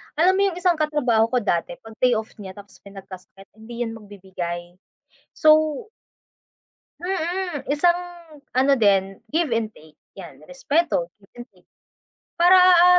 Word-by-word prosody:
Alam 365 Hz, +5 st, +3 dB
mo -, -, +2 dB
yung 360 Hz, -3 st, -4 dB
isang 355 Hz, -2 st, +2 dB
katrabaho 295 Hz, -8 st, +1 dB
ko 250 Hz, -, +3 dB
dati 175 Hz, -3 st, -2 dB
'pag 225 Hz, 0 st, -14 dB
pay 250 Hz, -1 st, +3 dB
off 220 Hz, -1 st, -3 dB
niya 190 Hz, -2 st, -9 dB
tapos 200 Hz, -1 st, -15 dB
may 200 Hz, -, -13 dB
nagkasakit, 195 Hz, 0 st, -13 dB
hindi 235 Hz, +2 st, -9 dB
yan 225 Hz, -1 st, -6 dB
magbibigay. 180 Hz, -4 st, -8 dB, 0.6 s
So 310 Hz, +5 st, +3 dB, 1.2 s
Mm, 355 Hz, -3 st, -3 dB
isang 345 Hz, +4 st, +2 dB, 0.6 s
ano 265 Hz, +2 st, +3 dB
din, 195 Hz, -2 st, +2 dB, 0.2 s
give 330 Hz, -4 st, +1 dB
and 225 Hz, -2 st, -1 dB
take 155 Hz, 0 st, -19 dB, 0.2 s
'yan, 170 Hz, -8 st, -11 dB
respeto, 270 Hz, -, -1 dB
give 195 Hz, -, -25 dB
and -, -, -16 dB
take. 180 Hz, -2 st, -28 dB, 0.7 s
Para 355 Hz, +2 st, +6 dB
ah, 360 Hz, -1 st, +7 dB
235 Hz, 150 wpm, -22 LUFS, -, 1.2 s, ah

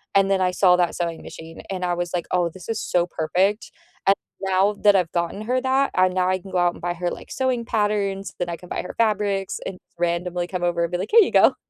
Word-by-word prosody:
And 195 Hz, 0 st, +4 dB
then 190 Hz, -1 st, +2 dB
I 180 Hz, -, +3 dB
saw 180 Hz, 0 st, +4 dB
that 175 Hz, -1 st, +1 dB
sewing 170 Hz, -2 st, -3 dB
machine 165 Hz, 0 st, -10 dB
and 185 Hz, -1 st, -3 dB
I 175 Hz, -1 st, +1 dB
was 175 Hz, 0 st, -3 dB
like, 175 Hz, -2 st, -1 dB
"Oh 175 Hz, -2 st, +2 dB
this 185 Hz, +4 st, -12 dB
is 225 Hz, -, -1 dB
so 175 Hz, -1 st, +1 dB
perfect," 185 Hz, +6 st, 0 dB, 0.4 s
and 195 Hz, -, +6 dB, 0.3 s
now 195 Hz, +2 st, +2 dB
that 205 Hz, -1 st, +6 dB
I've 180 Hz, -3 st, +1 dB
gotten 170 Hz, +4 st, -2 dB
her 250 Hz, +3 st, 0 dB
that, 265 Hz, +1 st, +2 dB
and 185 Hz, 0 st, +3 dB
now 185 Hz, 0 st, +1 dB
I 185 Hz, -, +2 dB
can 190 Hz, +1 st, -12 dB
go 185 Hz, -, -1 dB
out 175 Hz, 0 st, +3 dB
and -, -, -13 dB
buy 175 Hz, 0 st, -1 dB
her, 175 Hz, 0 st, -2 dB
like, -, -, -9 dB
sewing 255 Hz, -3 st, -1 dB
patterns, 205 Hz, -3 st, -1 dB
then 175 Hz, -, -2 dB
I 170 Hz, -, -4 dB
can 180 Hz, -, -14 dB
buy -, -, -3 dB
her -, -, -7 dB
fabrics 205 Hz, -3 st, 0 dB
and 185 Hz, -, -5 dB, 0.2 s
randomly 175 Hz, +1 st, -1 dB
come 180 Hz, 0 st, -4 dB
over 170 Hz, -1 st, +1 dB
and 170 Hz, -, -2 dB
be 175 Hz, -, 0 dB
like, 190 Hz, -, -3 dB
"Here 460 Hz, -, +8 dB
you 380 Hz, -, +2 dB
go." -, -, +5 dB
185 Hz, 260 wpm, -23 LUFS, 175-200 Hz, 0.4 s, Here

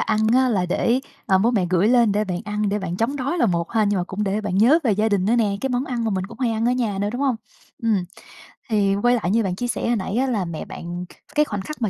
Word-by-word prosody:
ăn 215 Hz, -1 st, +1 dB
á 260 Hz, 0 st, +4 dB
là 190 Hz, -6 st, +1 dB
để, 235 Hz, +7 st, +1 dB, 0.3 s
ờ, 190 Hz, -3 st, +4 dB
bố 220 Hz, +5 st, +3 dB
mẹ 200 Hz, -7 st, +1 dB
gửi 185 Hz, +3 st, +3 dB
lên 235 Hz, -3 st, +4 dB
để 210 Hz, +1 st, +1 dB
bạn 180 Hz, -3 st, -3 dB
ăn 210 Hz, 0 st, -1 dB
để 205 Hz, +1 st, 0 dB
bạn 180 Hz, -2 st, -4 dB
chống 235 Hz, +7 st, -1 dB
đói 280 Hz, +6 st, -2 dB
là 240 Hz, -, +3 dB
một 170 Hz, -2 st, -1 dB
ha, 220 Hz, -2 st, +3 dB
nhưng 205 Hz, -1 st, +1 dB
mà 175 Hz, -, -1 dB
cũng 195 Hz, +3 st, -3 dB
để 200 Hz, +2 st, -1 dB
bạn 195 Hz, -3 st, -2 dB
nhớ 255 Hz, +10 st, +6 dB
về 230 Hz, -, +3 dB
gia 215 Hz, +2 st, +1 dB
đình 200 Hz, -3 st, +1 dB
nữa 225 Hz, +4 st, +2 dB
nè, 210 Hz, -4 st, +1 dB
cái 265 Hz, -, -2 dB
món 250 Hz, +1 st, 0 dB
ăn 245 Hz, -4 st, -3 dB
mà 225 Hz, -, 0 dB
mình 190 Hz, -2 st, -2 dB
cũng 230 Hz, +2 st, -13 dB
hay 250 Hz, -3 st, +1 dB
ăn 225 Hz, +1 st, 0 dB
ở -, -, +3 dB
nhà 230 Hz, -6 st, -1 dB
nữa, 205 Hz, -, 0 dB
đúng 245 Hz, -, -4 dB
hông? 270 Hz, -4 st, +1 dB, 0.5 s
Ừm, 215 Hz, -5 st, +1 dB, 0.7 s
thì 200 Hz, -3 st, +2 dB
quay 245 Hz, 0 st, +4 dB
lại 200 Hz, -6 st, -1 dB
như 225 Hz, +2 st, +2 dB
bạn 185 Hz, -3 st, -2 dB
chia 245 Hz, +6 st, -3 dB
sẻ 240 Hz, -, -2 dB
hồi 240 Hz, -, +2 dB
nãy 200 Hz, -1 st, -3 dB
á, 265 Hz, +2 st, +2 dB
là 215 Hz, -7 st, -1 dB
mẹ 170 Hz, -2 st, -6 dB
bạn, 175 Hz, +1 st, -6 dB
kh -, -, -18 dB, 0.2 s
cái 300 Hz, 0 st, +4 dB
khoảnh 205 Hz, -7 st, -4 dB
khắc 305 Hz, +7 st, -8 dB
mà 220 Hz, -, +1 dB
215 Hz, 315 wpm, -22 LUFS, 195-240 Hz, 0.7 s, nhớ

